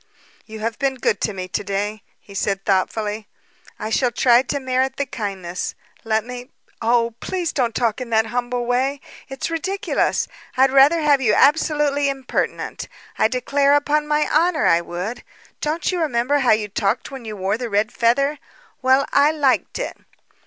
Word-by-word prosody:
"You 220 -1 -9
have 230 +3 -3
been 275 -2 0
good 225 -5 0
to - - 0
me 185 -2 -6
to - - -2
day," 205 +1 -3 0.2
he 200 - -15
said 195 0 -2
thoughtfully. 210 +2 -1 0.5
"I 215 - -5
shall 250 +2 +2
try 240 0 +4
to 275 +2 -3
merit 260 0 0
the 280 - 0
kindness. 195 -8 -5 0.3
Let 220 -1 0
me 250 0 -8 0.2
" - - -36
"Oh, 230 0 +2
please 355 -3 -3
don't 240 -5 0
talk 235 0 0
in 250 - -5
that 220 -1 +3
humble 245 +1 -2
way! 260 +3 0 0.3
It's 270 +4 -4
ridiculous! 380 +4 -1 0.3
I'd 265 +1 +5
rather 280 +5 +5
have 290 -3 +3
you 215 -5 +3
absolutely 290 -1 +3
impertinent, 270 -2 -3 0.3
I - - +5
declare 280 +4 +2
upon 295 +1 +1
my 300 0 +1
honor 325 +1 +2
I 170 +1 +4
would. 180 +8 -5 0.4
Don't 310 +5 -1
you 360 -2 -1
remember 285 -1 +1
how 255 -3 +3
you 215 -1 0
talked 200 +6 -1
when 265 -2 -8
you 215 -2 -7
wore 195 +3 -1
the 245 -2 -4
red 210 +2 +1
feather? 275 +5 +1 0.4
Well, 260 +1 +4
I 285 +1 +5
liked 285 -4 +1
it." - - -4
250 Hz, 175 wpm, -21 LUFS, 220-285 Hz, 0.5 s, I'd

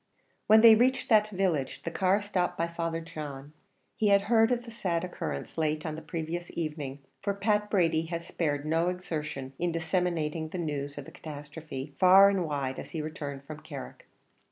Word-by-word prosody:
When 220 +1 +8
they 230 -1 +10
reached 250 +4 +2
that 215 -2 +5
village, 180 -9 -1
the 170 - -3
car 185 +3 +3
was 205 0 -2
stopped 180 -3 -1
by 165 - +1
Father 165 -1 -3
John. 150 -3 -8 0.4
He 215 - +1
had 200 -1 +5
heard 225 +2 +4
of 240 -1 0
the 235 - -10
sad 180 -7 -1
occurrence 180 -2 -5
late 155 0 0
on 155 - -2
the 160 - -6
previous 165 +2 -4
evening, 150 -4 -4 0.2
for 200 0 -1
Pat 210 +1 +1
Brady 165 -5 +2
had 170 0 -4
spared 145 -4 -2
no 165 +3 +2
exertions 155 -7 -4
in 175 0 0
disseminating 165 -2 -1
the 185 - -5
news 145 -4 -3
of 145 - -6
the - - -11
catastrophe 145 -2 -8
far 190 +2 +8
and 190 -4 0
wide 140 -3 -2
as - - -8
he 160 - -4
returned 145 -3 -6
from 155 +1 -8
Carrick. 65 - -9
165 Hz, 190 wpm, -29 LUFS, 150-190 Hz, 0.4 s, they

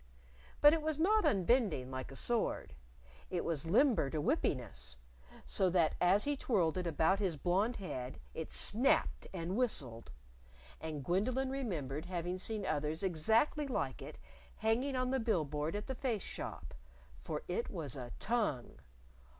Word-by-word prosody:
But 295 +1 +9
it 325 - +1
was 310 -1 -2
not 425 +6 +4
unbending, 190 - +2
like 130 0 -5
a - - -9
sword: 230 - -1 0.6
It 180 -2 -2
was 160 -1 -1
limber 225 - +4
to 155 - -3
whippiness, 130 - -1 0.5
so 190 - +2
that 170 -3 +3
as 190 +4 +5
he 290 0 +1
twirled 190 - +1
it 180 - -2
about 165 +4 +2
his 185 -6 0
blonde 195 - +1
head 130 -10 -5
it - - -5
snapped - - +2
and 180 +1 -3
whistled. 135 - -1 0.7
And 155 -4 -5
Gwendolyn 255 +9 +1
remembered 165 - -3
having 180 0 -3
seen 210 0 -2
others 155 +2 -1
exactly 220 - +2
like 265 - -2
it - - -8 0.4
hanging 240 +5 +1
on 255 0 0
the 265 - +1
bill 215 -9 +1
board 150 +4 -2
at 210 - -3
the 265 - -3
Face 240 -6 -2
Shop. - - -6 0.5
For 150 -1 -4
it 180 +6 -2
was 155 - -4
a 125 -3 -7
tongue! 210 - -1
185 Hz, 155 wpm, -35 LUFS, 150-240 Hz, 0.7 s, But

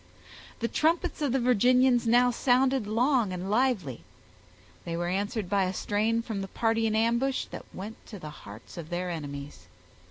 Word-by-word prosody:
The 230 - +1
trumpets 330 +4 0
of 285 -4 +1
the 270 - +2
Virginians 250 +1 +4
now 245 +2 +5
sounded 255 -1 +2
long 235 -1 +2
and 185 +2 -4
lively; 215 - 0 0.8
they 170 0 -4
were 175 0 -1
answered 205 +2 -2
by 195 0 +2
a 185 +1 -3
strain 220 +4 0
from 220 -4 -4
the 195 - -4
party 225 +2 +1
in 215 - 0
ambush 235 +4 +1
that - - -7
went 210 +4 -8
to 210 - -8
the 155 -4 -8
hearts 105 0 -12
of 165 -2 -7
their 180 +1 -2
enemies. 140 - -7
220 Hz, 170 wpm, -28 LUFS, 180-250 Hz, 0.8 s, now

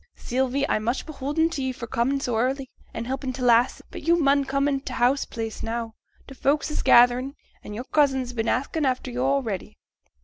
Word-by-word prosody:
Sylvie, 265 +3 -1
I'm 215 - 0
much 240 +4 -1
beholden 310 +2 -1
t' 295 - -3
ye 260 0 -1
for 245 -2 -7
comin' 240 +4 0
so 250 -4 -2
early, 260 +3 -1 0.2
and 225 - -5
helpin' 260 +1 -3
t' 255 0 -5
lasses, 240 0 +3
but - - -7
yo' 340 +1 +3
mun 280 -4 +3
come 275 +1 0
in 275 -1 +1
t' 270 - -7
house 255 +3 +2
place 225 -1 -5
now, 230 0 -3 0.3
t' - - -10
folks 285 +3 0
is - - -2
gatherin', 245 +3 +5 0.3
an' 210 - -7
yo'r 240 - -4
cousin's 265 -3 +1
been 225 -1 -1
asking 280 +4 -1
after 255 0 -2
yo' 260 +3 +1
a'ready.' 220 -9 -4
260 Hz, 205 wpm, -25 LUFS, 240-275 Hz, 0.3 s, gatherin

